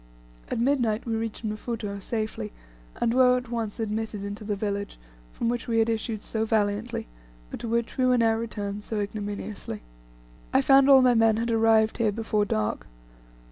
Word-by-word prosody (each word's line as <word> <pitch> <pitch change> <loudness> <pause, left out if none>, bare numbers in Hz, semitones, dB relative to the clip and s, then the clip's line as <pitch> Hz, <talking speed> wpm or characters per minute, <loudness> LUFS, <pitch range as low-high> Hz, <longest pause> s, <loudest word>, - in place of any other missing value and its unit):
At - - -2
midnight 240 -4 +1
we 230 - -2
reached 225 0 -4
Mfuto 215 -1 -4
safely, 215 - -3 0.5
and 230 - +1
were 250 0 +5
at 250 -1 -6
once 225 -2 -3
admitted 220 -1 -3
into 200 +1 -6
the 210 -1 -2
village, 200 0 -3 0.3
from - - -3
which 240 0 -1
we 230 -1 +1
had 225 0 +3
issued 220 -1 -2
so 220 -1 -1
valiantly, 215 +1 0 0.5
but - - -6
to - - -5
which 230 0 -1
we 255 - +4
were 250 0 +4
now 225 -1 +4
returned 210 -3 -4
so 215 -1 -3
ignominiously. 205 - -5 0.7
I 135 - +4
found 275 0 +6
all 265 -2 +8
my 250 -1 +5
men 225 -1 +4
had 230 +1 -1
arrived 225 0 +3
here 220 -2 +3
before 215 -1 0
dark. 110 - -2
225 Hz, 180 wpm, -26 LUFS, 210-235 Hz, 0.7 s, all